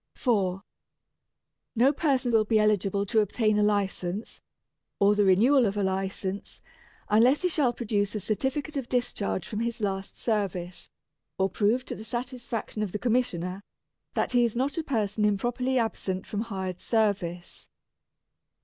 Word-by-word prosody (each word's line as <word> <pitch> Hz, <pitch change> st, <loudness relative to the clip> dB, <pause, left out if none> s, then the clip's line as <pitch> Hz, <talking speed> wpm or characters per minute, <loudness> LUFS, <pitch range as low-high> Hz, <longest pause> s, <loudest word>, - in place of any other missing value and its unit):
4. 195 Hz, -6 st, 0 dB, 1.1 s
No 255 Hz, +5 st, +4 dB
person 270 Hz, -5 st, +1 dB
will 225 Hz, -2 st, +4 dB
be 220 Hz, +1 st, +2 dB
eligible 200 Hz, -2 st, +2 dB
to 220 Hz, +2 st, +2 dB
obtain 215 Hz, +1 st, +2 dB
a -, -, +3 dB
License, 205 Hz, -1 st, -1 dB, 0.6 s
or 200 Hz, +1 st, +4 dB
the 205 Hz, 0 st, +3 dB
renewal 230 Hz, +7 st, +5 dB
of 200 Hz, +1 st, -3 dB
a 205 Hz, -, +1 dB
License, 190 Hz, +1 st, -3 dB, 0.5 s
unless 240 Hz, -, +4 dB
he 360 Hz, -, +3 dB
shall 290 Hz, -7 st, +2 dB
produce 210 Hz, -4 st, -1 dB
a -, -, -1 dB
certificate 265 Hz, -, -2 dB
of 265 Hz, -3 st, -4 dB
discharge 230 Hz, -7 st, -1 dB
from 210 Hz, -, -4 dB
his 235 Hz, +1 st, -2 dB
last 195 Hz, -2 st, -3 dB
service, 185 Hz, -5 st, -2 dB, 0.5 s
or 190 Hz, 0 st, +2 dB
prove 225 Hz, +6 st, +1 dB
to -, -, -5 dB
the 215 Hz, -, -8 dB
satisfaction 240 Hz, -1 st, -4 dB
of 205 Hz, -4 st, -2 dB
the -, -, 0 dB
Commissioner 200 Hz, -6 st, -1 dB, 0.5 s
that -, -, 0 dB
he 245 Hz, -1 st, +4 dB
is 235 Hz, -1 st, 0 dB
not 265 Hz, +4 st, 0 dB
a -, -, -2 dB
person 215 Hz, -6 st, -1 dB
improperly 240 Hz, +5 st, +1 dB
absent 200 Hz, -5 st, -1 dB
from 210 Hz, -, -3 dB
hired 190 Hz, -5 st, -4 dB
service. 195 Hz, -6 st, -1 dB
215 Hz, 150 wpm, -27 LUFS, 195-240 Hz, 1.1 s, renewal